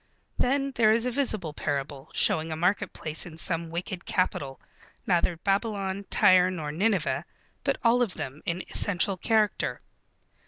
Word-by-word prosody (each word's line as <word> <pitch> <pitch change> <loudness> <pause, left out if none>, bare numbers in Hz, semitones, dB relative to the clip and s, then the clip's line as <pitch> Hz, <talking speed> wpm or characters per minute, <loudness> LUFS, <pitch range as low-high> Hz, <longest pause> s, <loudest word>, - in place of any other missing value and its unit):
Then 275 +2 +1
there 220 -2 +5
is 230 +2 +2
a 250 - 0
visible 215 - -1
parable, 140 0 -3
showing 160 +1 +1
a - - -2
marketplace 175 -2 0
in 160 -2 -11
some 165 0 -1
wicked 175 +2 -5
capital, 140 -7 -1 0.5
neither 175 -2 +2
Babylon, 200 +1 -1
Tyre, 185 0 +5
nor 160 -5 -4
Nineveh, 190 +1 +1 0.4
but - - +1
all 240 +1 +4
of 225 -7 0
them 135 +3 -6
in 175 +2 -2
essential 195 0 +1
character. 215 +2 +1
185 Hz, 145 wpm, -27 LUFS, 160-215 Hz, 0.5 s, there